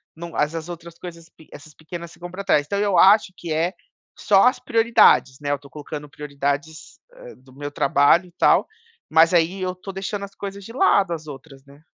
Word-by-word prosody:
não 170 Hz, 0 st, -9 dB
essas 160 Hz, +2 st, -2 dB
outras 170 Hz, -1 st, -9 dB
coisas, 170 Hz, -2 st, -10 dB
pi 160 Hz, -, -20 dB
essas 150 Hz, +1 st, -13 dB
pequenas 170 Hz, +2 st, -9 dB
ficam 175 Hz, 0 st, -10 dB
pra 195 Hz, +2 st, -7 dB
trás, 150 Hz, -7 st, +2 dB
então 200 Hz, +6 st, -3 dB
eu 200 Hz, -3 st, +1 dB
acho 195 Hz, +2 st, +5 dB
que 170 Hz, -, -7 dB
é 165 Hz, +4 st, 0 dB, 0.4 s
só 195 Hz, -2 st, +4 dB
as 255 Hz, -, +2 dB
prioridades, 225 Hz, -, +3 dB
né, 145 Hz, -1 st, -2 dB
eu 145 Hz, -, -1 dB
tô 140 Hz, -, -16 dB
colocando 150 Hz, 0 st, -8 dB
prioridades, 145 Hz, +2 st, -5 dB, 0.2 s
hã, -, -, -13 dB
do 130 Hz, 0 st, -21 dB
meu 145 Hz, +1 st, -6 dB
trabalho 145 Hz, +5 st, +3 dB
e 175 Hz, -, -19 dB
tal, -, -, +3 dB, 0.4 s
mas 160 Hz, +2 st, +4 dB
aí 175 Hz, +3 st, +2 dB
eu 185 Hz, 0 st, -2 dB
estou 185 Hz, +2 st, -9 dB
deixando 200 Hz, +1 st, -5 dB
as 200 Hz, -, -16 dB
coisas 200 Hz, 0 st, -7 dB
de 230 Hz, -, -10 dB
lado, 200 Hz, -7 st, +3 dB
as 155 Hz, -1 st, -7 dB
outras, 135 Hz, -1 st, -12 dB
né. 140 Hz, +2 st, -19 dB
165 Hz, 205 wpm, -22 LUFS, 145-190 Hz, 0.4 s, acho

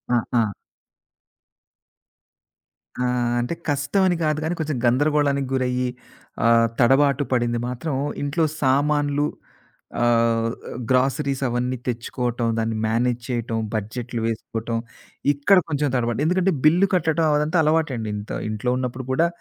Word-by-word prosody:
ఆ! -, -, +4 dB, 0.2 s
ఆ! 110 Hz, -, +2 dB, 2.6 s
ఆ! -, -, +1 dB, 0.3 s
అంటే 120 Hz, +7 st, -2 dB, 0.2 s
కష్టమని 175 Hz, +6 st, +2 dB
గాదు 155 Hz, 0 st, +1 dB
కానీ, 170 Hz, +2 st, -1 dB
కొంచెం 155 Hz, -3 st, -2 dB
గందరగోళానికి 140 Hz, +1 st, +2 dB
గురయ్యి 125 Hz, -1 st, 0 dB, 0.6 s
ఆహ్, 115 Hz, 0 st, +5 dB
తడబాటు 135 Hz, +3 st, +4 dB
పడింది 120 Hz, -1 st, +1 dB
మాత్రం 130 Hz, +4 st, -3 dB, 0.3 s
ఇంట్లో 145 Hz, +4 st, 0 dB, 0.2 s
సామాన్లు 145 Hz, +1 st, +2 dB, 0.8 s
ఆహ్, 115 Hz, -1 st, +3 dB, 0.4 s
గ్రాసరీస్ 135 Hz, +1 st, +1 dB
అవన్నీ 125 Hz, +1 st, -1 dB
తెచ్చుకోవటం, 120 Hz, 0 st, -2 dB
దాన్ని 110 Hz, 0 st, -1 dB
మేనేజ్ 120 Hz, +2 st, 0 dB
చేయటం, 120 Hz, -2 st, -2 dB
బడ్జెట్లు 115 Hz, +3 st, -3 dB
వేసుకోటం, 115 Hz, 0 st, -3 dB, 0.6 s
ఇక్కడ 145 Hz, +8 st, +4 dB
కొంచెం 145 Hz, -1 st, 0 dB
తడబడ్డా. 120 Hz, 0 st, 0 dB
ఎందుకంటే, 185 Hz, +3 st, +2 dB
బిల్లు 175 Hz, +6 st, +5 dB
కట్టటం 160 Hz, -2 st, +2 dB
అదంతా 150 Hz, +4 st, +1 dB
అలవాటండి. 150 Hz, -8 st, 0 dB
ఇంత 105 Hz, -, -7 dB, 0.2 s
ఇంట్లో 110 Hz, +3 st, -1 dB
ఉన్నప్పుడు 130 Hz, 0 st, -4 dB
గూడా 165 Hz, +6 st, +3 dB
130 Hz, 115 wpm, -23 LUFS, 120-150 Hz, 2.6 s, ఆహ్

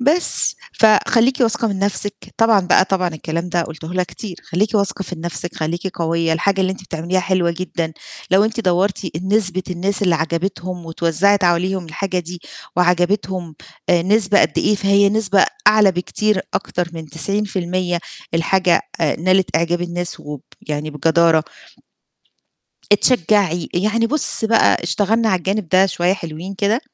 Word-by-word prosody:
بس 300 Hz, +8 st, +5 dB, 0.2 s
فخلّيكِ 230 Hz, +4 st, +3 dB
واثقة 230 Hz, -1 st, +2 dB
من 195 Hz, -2 st, -3 dB
نَفْسِك. 200 Hz, +1 st, -1 dB, 0.2 s
طبعًا 225 Hz, -3 st, +4 dB
بقى 180 Hz, +1 st, +3 dB
طبعًا 185 Hz, -2 st, 0 dB
الكلام 165 Hz, +2 st, -5 dB
ده 175 Hz, -1 st, 0 dB
قلته 160 Hz, +1 st, -8 dB
لها 185 Hz, -, +1 dB
كتير، 185 Hz, 0 st, -9 dB
خلّيكِ 200 Hz, +6 st, 0 dB
واثقة 200 Hz, -1 st, 0 dB
في 180 Hz, -, -7 dB
نَفْسِك، 170 Hz, +1 st, -4 dB
خلّيكِ 165 Hz, +4 st, -3 dB
قوية، 165 Hz, 0 st, 0 dB
الحاجة 195 Hz, +4 st, 0 dB
اللي 190 Hz, 0 st, +1 dB
أنتِ 190 Hz, -, -10 dB
بتعمليها 175 Hz, +3 st, -2 dB
حلوة 180 Hz, -1 st, 0 dB
جدًا، 170 Hz, -3 st, -3 dB, 0.4 s
لو 195 Hz, +3 st, +4 dB
أنتِ 225 Hz, +1 st, -2 dB
دوّرتِ 190 Hz, +1 st, 0 dB
ال 175 Hz, +2 st, -5 dB
نسبة 190 Hz, -3 st, +1 dB
الناس 190 Hz, +3 st, -1 dB
اللي 180 Hz, -3 st, +2 dB
عَجَبتهم 170 Hz, +2 st, -3 dB
واتوزّعت 170 Hz, +4 st, +1 dB
عليهم 180 Hz, +1 st, +1 dB
الحاجة 185 Hz, +4 st, -3 dB
دي 175 Hz, 0 st, -7 dB, 0.4 s
وعَجَبتهم 180 Hz, -1 st, 0 dB, 0.3 s
آآ، 175 Hz, -1 st, +3 dB
نسبة 205 Hz, +1 st, +3 dB
قد -, -, +1 dB
إيه، 210 Hz, -, +2 dB
فهي 200 Hz, 0 st, +3 dB
نسبة 200 Hz, -2 st, +2 dB, 0.2 s
أعلى 210 Hz, -2 st, +6 dB
بكتير 190 Hz, +3 st, -1 dB
أكتر 175 Hz, -1 st, -2 dB
من 160 Hz, -2 st, -8 dB
90% 185 Hz, +1 st, -2 dB, 0.4 s
الحاجة 180 Hz, +2 st, +2 dB, 0.2 s
آآ، 155 Hz, -3 st, +1 dB
نالت 185 Hz, -1 st, +1 dB
أعجاب 170 Hz, +1 st, 0 dB
الناس 175 Hz, 0 st, -4 dB
وب 145 Hz, -2 st, -8 dB, 0.3 s
يعني 150 Hz, +1 st, -3 dB
بجدارة. 160 Hz, +1 st, +2 dB, 1.5 s
اتشجّعي. 200 Hz, -5 st, +2 dB
يعني 215 Hz, +5 st, +1 dB
بُص 290 Hz, -3 st, +2 dB
بقى 225 Hz, -4 st, +3 dB
اشتغلنا 205 Hz, +7 st, 0 dB
على 190 Hz, -3 st, +2 dB
الجانب 190 Hz, 0 st, -3 dB
ده 185 Hz, +2 st, +4 dB
شوية 180 Hz, -1 st, 0 dB
حلوين 170 Hz, +1 st, -7 dB
كده. 205 Hz, +5 st, 0 dB
185 Hz, 150 wpm, -18 LUFS, 170-200 Hz, 1.5 s, أعلى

